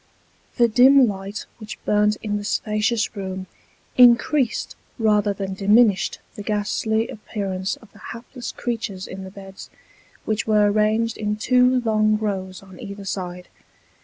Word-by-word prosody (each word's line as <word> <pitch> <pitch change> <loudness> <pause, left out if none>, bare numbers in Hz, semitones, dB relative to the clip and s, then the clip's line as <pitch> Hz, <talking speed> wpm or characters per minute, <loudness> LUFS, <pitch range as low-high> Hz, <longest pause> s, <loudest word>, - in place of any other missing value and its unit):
The 240 -2 +5
dim 255 +3 +6
light 195 +1 -5
which 215 -1 -8
burnt 210 0 +2
in 205 -1 -1
the 205 - -5
spacious 215 +2 0
room, 190 -1 -5 0.5
increased 245 +1 +4 0.2
rather 210 -3 +2
than 195 -1 -4
diminished 205 +1 +3 0.2
the - - -8
ghastly 220 +2 -1
appearance 195 -3 -4
of 225 -4 -19
the 205 - -17
hapless 235 +3 -8
creatures 225 -6 -4
in 190 +1 -8
the - - -8
beds, 195 0 -11 0.6
which 215 0 -1
were 210 -1 +4
ranged 215 +2 +1
in 210 -1 -1
two 250 +3 +3
long 215 -2 +2
rows 190 -3 -4
on 190 -2 -14
either 200 0 -8
side. 180 -2 -5
210 Hz, 140 wpm, -22 LUFS, 195-225 Hz, 0.6 s, dim